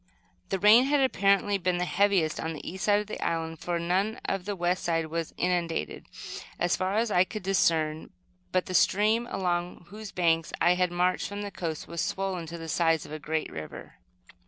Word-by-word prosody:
The 195 Hz, -, 0 dB
rain 215 Hz, +6 st, +7 dB
had 290 Hz, +1 st, +2 dB
apparently 200 Hz, -5 st, +2 dB
been 180 Hz, -1 st, 0 dB
the 180 Hz, -, 0 dB
heaviest 190 Hz, -4 st, +2 dB
on 160 Hz, 0 st, -3 dB
the 155 Hz, -, -9 dB
east 185 Hz, +1 st, -4 dB
side 205 Hz, 0 st, +4 dB
of -, -, -7 dB
the 215 Hz, -, -6 dB
island, 165 Hz, -1 st, -2 dB
for 175 Hz, -1 st, -2 dB
none 185 Hz, +6 st, 0 dB
of 195 Hz, -2 st, -2 dB
the 205 Hz, 0 st, -3 dB
west 175 Hz, 0 st, 0 dB
side 165 Hz, -1 st, 0 dB
was 165 Hz, 0 st, -4 dB
inundated, 170 Hz, -, -1 dB, 0.5 s
as 175 Hz, 0 st, +1 dB
far 185 Hz, +2 st, -1 dB
as 225 Hz, 0 st, +1 dB
I 180 Hz, -, +5 dB
could 210 Hz, +2 st, -7 dB
discern; 160 Hz, -5 st, +1 dB, 0.4 s
but 185 Hz, 0 st, +1 dB
the 185 Hz, -, -6 dB
stream, 215 Hz, +6 st, +3 dB
along 175 Hz, -1 st, -2 dB
whose 210 Hz, 0 st, -8 dB
banks 165 Hz, -2 st, +1 dB
I 175 Hz, -, +5 dB
had 180 Hz, 0 st, +1 dB
marched 180 Hz, +1 st, +1 dB
from 205 Hz, 0 st, -5 dB
the 205 Hz, -, -5 dB
coast, 160 Hz, -5 st, -5 dB
was 170 Hz, 0 st, -3 dB
swollen 190 Hz, -3 st, -2 dB
to 170 Hz, +1 st, -7 dB
the 165 Hz, -1 st, -7 dB
size 165 Hz, -1 st, +1 dB
of -, -, -12 dB
a 155 Hz, -, -5 dB
great 155 Hz, +2 st, -2 dB
river. 75 Hz, 0 st, -9 dB
180 Hz, 205 wpm, -28 LUFS, 165-200 Hz, 0.5 s, rain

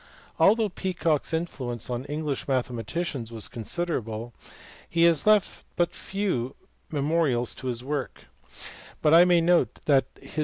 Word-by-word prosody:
Although 220 Hz, +1 st, +4 dB
Peacock 175 Hz, -5 st, -1 dB
s -, -, -3 dB
influence 130 Hz, -8 st, -3 dB
on 125 Hz, +1 st, -3 dB
English 150 Hz, -1 st, -3 dB
mathematicians 130 Hz, +1 st, -2 dB
was 110 Hz, -2 st, -1 dB
considerable 120 Hz, -4 st, -4 dB, 0.6 s
he 170 Hz, 0 st, +2 dB
has 170 Hz, +1 st, +4 dB
left 210 Hz, -2 st, +3 dB
but 175 Hz, -1 st, +1 dB
few 185 Hz, -12 st, -2 dB, 0.3 s
me 145 Hz, -3 st, -2 dB
morials 140 Hz, -6 st, +1 dB
of 130 Hz, -, -7 dB
his 120 Hz, -1 st, -2 dB
work; 145 Hz, 0 st, -4 dB, 0.8 s
but 150 Hz, -, +5 dB
I 170 Hz, +2 st, +8 dB
may 175 Hz, -1 st, +4 dB
note 175 Hz, +1 st, +3 dB
that 140 Hz, -3 st, +4 dB
his. -, -, -7 dB
150 Hz, 145 wpm, -26 LUFS, 125-170 Hz, 0.8 s, I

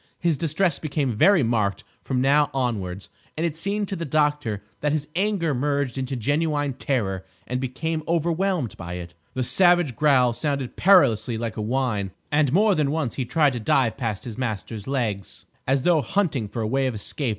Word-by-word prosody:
His 170 Hz, -3 st, +1 dB
distress 165 Hz, +2 st, 0 dB
became 140 Hz, -6 st, -1 dB
very 180 Hz, -, +5 dB
marked 110 Hz, -4 st, 0 dB, 0.2 s
from 130 Hz, -2 st, -1 dB
now 145 Hz, +2 st, +4 dB
onwards, 100 Hz, -8 st, -2 dB, 0.3 s
and 165 Hz, -, 0 dB
it 160 Hz, -3 st, -2 dB
seemed 200 Hz, +4 st, -1 dB
to 195 Hz, -, -2 dB
the 170 Hz, -, -4 dB
doctor 145 Hz, -9 st, 0 dB, 0.2 s
that 150 Hz, 0 st, 0 dB
his 150 Hz, -1 st, -2 dB
anger 190 Hz, -5 st, +1 dB
merged 140 Hz, -1 st, -1 dB
into 130 Hz, 0 st, -3 dB
genuine 145 Hz, +3 st, 0 dB
terror 105 Hz, -8 st, -2 dB, 0.2 s
and 125 Hz, +1 st, -3 dB
became 155 Hz, +5 st, -2 dB
overwhelmed 170 Hz, -, 0 dB
by 85 Hz, -1 st, -6 dB
it. 90 Hz, -1 st, -7 dB, 0.2 s
The 130 Hz, -, 0 dB
savage 175 Hz, -2 st, +3 dB
growl 130 Hz, -3 st, +4 dB
sounded 140 Hz, -1 st, -2 dB
perilously 120 Hz, -, +4 dB
like 115 Hz, -1 st, -4 dB
a 110 Hz, -, -3 dB
whine, 110 Hz, -4 st, -1 dB, 0.2 s
and 145 Hz, -2 st, +3 dB
more 205 Hz, +6 st, +4 dB
than 150 Hz, -5 st, +1 dB
once 150 Hz, -5 st, -1 dB
he 130 Hz, -, -3 dB
tried 150 Hz, +1 st, +2 dB
to 120 Hz, -, -3 dB
dive 115 Hz, +1 st, +2 dB
past 115 Hz, -6 st, -3 dB
his 120 Hz, 0 st, -7 dB
master's 110 Hz, -3 st, -4 dB
legs, 115 Hz, -8 st, -3 dB, 0.2 s
as 135 Hz, 0 st, +2 dB
though 170 Hz, -3 st, +4 dB
hunting 145 Hz, -, 0 dB
for 115 Hz, +2 st, -4 dB
a -, -, -1 dB
way 135 Hz, +3 st, +1 dB
of 125 Hz, -, -3 dB
escape. 125 Hz, +5 st, -3 dB
135 Hz, 185 wpm, -24 LUFS, 115-155 Hz, 0.3 s, very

